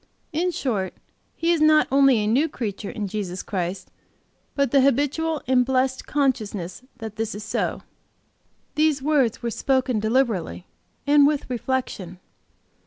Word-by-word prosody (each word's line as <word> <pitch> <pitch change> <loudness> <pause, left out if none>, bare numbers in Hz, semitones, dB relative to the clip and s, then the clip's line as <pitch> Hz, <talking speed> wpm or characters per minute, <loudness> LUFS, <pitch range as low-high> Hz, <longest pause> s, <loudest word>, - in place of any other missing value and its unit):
In 345 +4 +1
short, 220 - -2 0.4
he 335 +1 +1
is 335 -2 +1
not 310 0 +5
only 275 -2 +5
a 210 - 0
new 265 +9 +2
creature 210 -6 -5
in 210 -2 -4
Jesus 190 -3 -4
Christ, 185 -1 -4 0.6
but 280 -4 +1
the 275 - +5
habitual 290 +4 +1
and 255 -1 +3
blessed 260 0 0
consciousness 215 -11 -1 0.2
that 220 -2 -8
this 220 -2 -2
is 210 - -6
so." - - -2 0.9
These 300 -3 +2
words 275 -8 +1
were 235 - -1
spoken 260 -2 +1
deliberately 215 - 0 0.4
and 285 0 +6
with 295 -1 -1
reflection. 235 -8 -3
255 Hz, 140 wpm, -23 LUFS, 210-285 Hz, 0.9 s, and